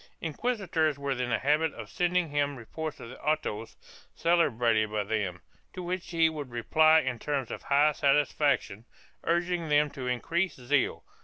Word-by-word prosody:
3 165 - -2
Inquisitors 165 - 0
were 140 0 -3
in 125 -2 -1
the 115 - +2
habit 150 +3 +2
of - - -8
sending 180 -1 0
him 145 -1 0
reports 155 +6 -6
of 115 - -9
the - - -12
autos 140 -8 -2 0.4
celebrated 120 -10 +2
by 105 -1 -1
them, 100 -5 -2 0.3
to 180 - -6
which 180 0 -4
he 165 -1 +3
would 150 -4 -5
reply 155 +7 +4
in 130 -3 -3
terms 140 -5 -2
of - - -5
high 145 +2 +3
satisfaction, 140 -6 +1 0.4
urging 170 -1 0
them 150 0 +3
to 130 -2 -6
increased 165 +8 -1
zeal. 130 +2 0
145 Hz, 165 wpm, -29 LUFS, 125-165 Hz, 0.4 s, reply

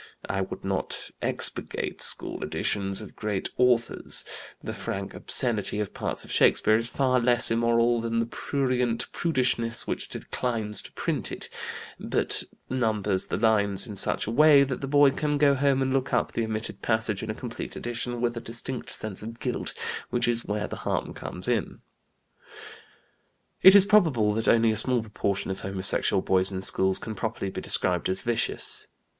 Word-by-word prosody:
I 95 - -1
would 95 - -6
not - - -2
'expurgate' - - -2
school - - +1
editions 100 0 -2
of 105 - -11
great 105 -3 -3
authors; 125 -2 +1 0.4
the - - -4
frank - - -5
obscenity 105 -4 0
of 105 -2 -3
parts - - -2
of - - -10
Shakespeare 110 - +4
is 115 +1 +2
far 130 -1 +1
less 120 0 +4
immoral 115 0 +2
than 115 0 -2
the 115 - +1
prurient 125 -1 -1
prudishness 125 -7 0
which - - -4
declines 110 -4 +1
to - - -10
print - - -2
it, - - -7 0.5
but - - -1 0.2
numbers 105 -6 0
the - - -2
lines 105 -3 +3
in 105 -4 -8
such 100 - -1
a 110 - -3
way 145 +2 +6
that 135 -2 -3
the 135 - -3
boy 145 0 +5
can 150 +1 -1
go 145 -1 +4
home 135 0 +2
and 130 0 -1
look 135 -1 0
up 125 - +1
the 115 - -1
omitted 110 0 -3
passage 110 -3 +1
in 110 - -6
a 110 - -3
complete 120 0 -7
edition, 120 0 -4
with 120 -1 0
a 115 - -5
distinct 120 +3 -6
sense 105 -3 -5
of 115 +2 -8
guilt, 125 -2 -3 0.4
which 120 - 0
is 120 -1 +2
where 105 0 -2
the - - -7
harm - - -3
comes 90 +4 -6
in." 120 -4 -1 1.8
It 190 +1 +9
is 200 -1 +8
probable 155 - +3
that 110 +1 -2
only 115 -1 +4
a 110 - -1
small 120 +1 +2
proportion 100 -2 -2
of 95 - -4
homosexual 95 0 -1
boys 95 0 +3
in 95 -1 -4
schools 95 0 +4
can 110 - -5
properly 110 -2 -4
be - - -5
described 90 -2 +1
as 95 +1 +1
"vicious." 120 -1 -1
115 Hz, 175 wpm, -26 LUFS, 105-125 Hz, 1.8 s, It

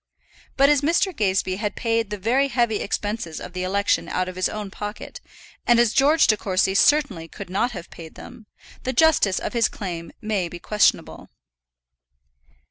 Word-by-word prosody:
But 275 +1 +5
as 295 -2 +3
Mr. 340 +5 +1
Gazebee 190 -2 0
had 210 0 -3
paid 230 -2 -1
the 210 - -4
very 245 +8 +1
heavy 235 -4 0
expenses 205 -6 -4
of 180 - -9
the 185 - -4
election 200 +2 0
out 185 0 -1
of 185 - -7
his 185 0 0
own 210 -2 -6
pocket, 210 +1 -7 0.5
and 240 -1 +5
as 235 -2 +3
George 300 +4 +4
De 215 - +4
Courcy 190 -2 0
certainly 220 - +2
could 195 +2 -10
not 240 +5 0
have 175 -5 -9
paid 160 -2 -11
them, 220 - -12 0.3
the 260 - -3
justice 260 -9 +3
of - - -4
his 235 -1 +2
claim 170 -5 -6
may 205 -5 -2
be 175 - -8
questionable. 210 +4 0
210 Hz, 175 wpm, -23 LUFS, 185-240 Hz, 0.5 s, But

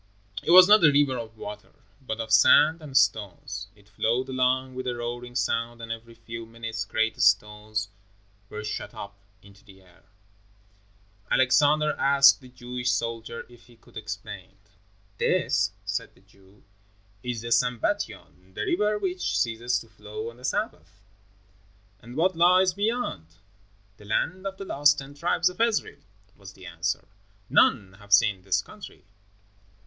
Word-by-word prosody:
It - - -6
was 180 +1 +9
not 210 -2 +6
a 150 - +7
river 140 -2 +3
of 110 -1 -9
water, 105 0 -9 0.3
but 115 -4 -5
of 110 -1 -5
sand 155 +8 +6
and 140 -3 -2
stones. 105 -3 0
It 100 -1 -23
flowed 115 +6 -1
along 130 0 0
with 130 0 -6
a 125 - -1
roaring 120 +1 -6
sound 120 -2 -1
and 115 0 -7
every 115 0 -8
few 115 0 -9
minutes 115 -1 -5
great 110 +2 -1
stones 105 +1 +1 0.6
were 105 0 -7
shot 105 - -5
up 100 0 -8 0.3
into 100 0 -18
the 95 -3 -18
air. 90 -1 -23 1.3
Alexander 150 +4 +3
asked 140 0 +5
the 130 - -14
Jewish 125 0 -4
soldier 115 -1 -3
if 120 -1 -19
he 120 - -19
could 115 - -23
explain. 105 -3 -8 0.6
"This," - - +1 0.2
said - - -4
the - - -24
Jew, 95 0 -24 0.6
"is 120 -1 -4
the 115 0 -7
Sambatyon, 110 -6 -2
the - - -3
river 210 +4 +1
which 185 -3 -2
ceases 120 +1 0
to 115 - -14
flow 110 +1 -8
on 115 - -19
the 125 - -17
Sabbath." 100 - -4 1.0
"And 120 +4 -12
what 180 +4 +1
lies 180 +2 +4
beyond?" 205 - -2 0.7
"The 105 - -16
land 180 - -1
of 195 0 -6
the 195 - -7
Lost 145 -3 +3
Ten 140 0 -8
Tribes 175 +3 +1
of 180 - -6
Israel," 230 -2 0 0.4
was 100 -1 -13
the 95 -1 -14
answer. 85 +1 -3 0.4
"None 95 -7 +3
have 100 0 -17
seen 100 -1 +4
this 95 0 0
country." - - -13
115 Hz, 155 wpm, -26 LUFS, 105-140 Hz, 1.3 s, was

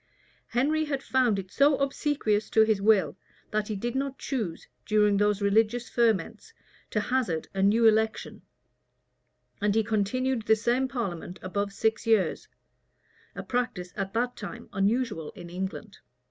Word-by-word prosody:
Henry 305 +6 +1
had 275 -2 -3
found 250 -5 +2
it 190 -1 -6
so 280 0 +4
obsequious 275 -6 0
to 220 - +5
his 215 -2 +1
will, 195 -8 +3 0.4
that 215 -1 -1
he 215 - -3
did 235 +4 -3
not 270 0 -2
choose, 220 - -4 0.2
during 210 -1 +3
those 205 0 +1
religious 225 +4 +2
ferments, 225 - 0 0.4
to 210 - 0
hazard 210 -9 -1
a 195 - -1
new 215 +4 +4
election; 220 0 +1 1.2
and 205 0 +1
he 220 - +3
continued 225 +3 -1
the 220 - +6
same 240 +4 +1
parliament 195 -9 -4
above 200 +2 -2
six 220 +3 -1
years: 210 -7 +2 0.9
a - - -5
practice 220 -8 -3
at 195 -2 -3
that 245 +2 0
time 205 - -8
unusual 200 -4 0
in 170 -1 -10
England. 190 +3 -6
220 Hz, 145 wpm, -27 LUFS, 200-245 Hz, 1.2 s, the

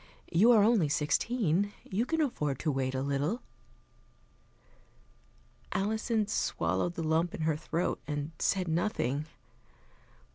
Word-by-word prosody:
You 205 +8 +5
are 215 -3 +6
only 210 -8 +3
sixteen, 200 - +1
you 215 +6 -1
can 325 0 +1
afford 150 - -1
to 155 - +1
wait 135 -1 -1
a 130 - -1
little." 140 - -1 2.3
Alison 220 +2 0
swallowed 175 -4 -1
the 165 - -3
lump 160 +2 +1
in - - -6
her 155 -1 +1
throat 165 +3 -2
and 145 +1 -3
said 185 -2 +1
nothing. 160 - -1
170 Hz, 120 wpm, -30 LUFS, 150-215 Hz, 2.3 s, are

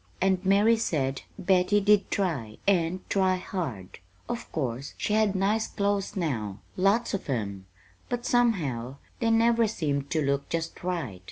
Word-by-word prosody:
"And 190 0 +2
Mary 205 +4 +4
said 135 - -1 0.2
Betty 190 +1 +3
did 205 0 +3
try, 140 - -2
and 185 -1 +1
try 190 -1 +2
hard. 145 - -5 0.3
Of 240 0 -5
course 130 -2 -3
she 210 - -1
had 215 -2 +3
nice 205 +4 +1
clo's 200 -1 -1
now, 115 - -2 0.2
lots 200 +5 +2
of 195 - -3
'em; 100 -6 -3 0.4
but 245 0 -3
somehow 150 - +1 0.2
they 230 - +1
never 230 0 +4
seemed 145 -9 -2
to 155 -3 0
look 140 0 -1
just 165 +1 -3
right. 170 - -3
185 Hz, 150 wpm, -27 LUFS, 140-205 Hz, 0.4 s, Mary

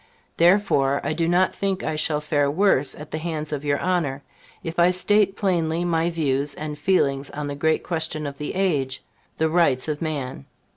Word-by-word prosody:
Therefore 170 -7 +3
I - - -1
do 165 +1 0
not 180 +2 +3
think 195 -1 -2
I 155 - -1
shall 150 0 0
fare 145 -2 +1
worse 145 -4 +2
at 150 0 -10
the 155 - -3
hands 155 -2 -4
of 145 -1 -3
your 145 -1 +1
Honor, 160 -7 -1 0.4
if 165 +1 -4
I 170 +1 +6
state 195 +2 +2
plainly 170 -4 0
my 165 -1 +1
views 145 -4 -1
and 150 -1 -5
feelings 140 -4 +1
on 150 0 -5
the 145 0 -4
great 160 +2 +1
question 160 -2 -2
of 140 -1 -6
the 150 - -4
age 145 -9 0 0.3
the 160 - +2
rights 160 -6 +2
of 150 -1 -3
man. 140 -4 -4
155 Hz, 190 wpm, -23 LUFS, 145-175 Hz, 0.4 s, I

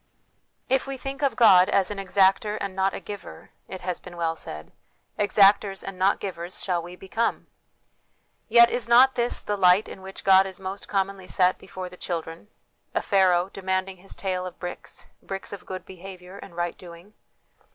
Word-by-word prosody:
" - - -46
If 265 - -10
we 275 -1 -4
think 270 +2 -6
of 275 -5 +1
God 190 -6 +7
as 195 +1 +2
an 205 - -5
exactor 195 +2 +2
and 195 -1 -4
not 190 0 +1
a - - -4
giver," 205 -1 -10 0.2
it 190 - -8
has 180 -1 -3
been 175 -1 -12
well 165 -1 -1
said, 75 - -8 0.2
" - - -32
exactors 200 -1 +4
and 195 -1 -7
not 195 +2 +3
givers 175 -2 -6
shall 180 -3 0
we 175 +1 -9
become." 210 +5 -2 1.0
Yet 235 +1 +7
is 240 -1 -2
not 255 +3 +7
this 240 0 -1
the 205 - -1
light 185 +1 +4
in 190 - -10
which 190 0 -9
God 190 0 +6
is 190 -2 -7
most 190 +1 -6
commonly 195 -1 -2
set 185 0 +2
before 185 0 -7
the 180 0 -12
children 165 +1 -5 0.5
a - - +2
Pharaoh 185 -2 +3
demanding 190 0 -2
his 195 +2 -11
tale 185 -2 -2
of 180 - -10
bricks, 180 -1 -6 0.2
bricks 195 +1 -6
of 200 - -9
good 185 -1 -6
behaviour 185 0 -11
and 175 - -12
right 175 0 -2
doing? 175 +3 -13
190 Hz, 190 wpm, -25 LUFS, 180-200 Hz, 1.0 s, God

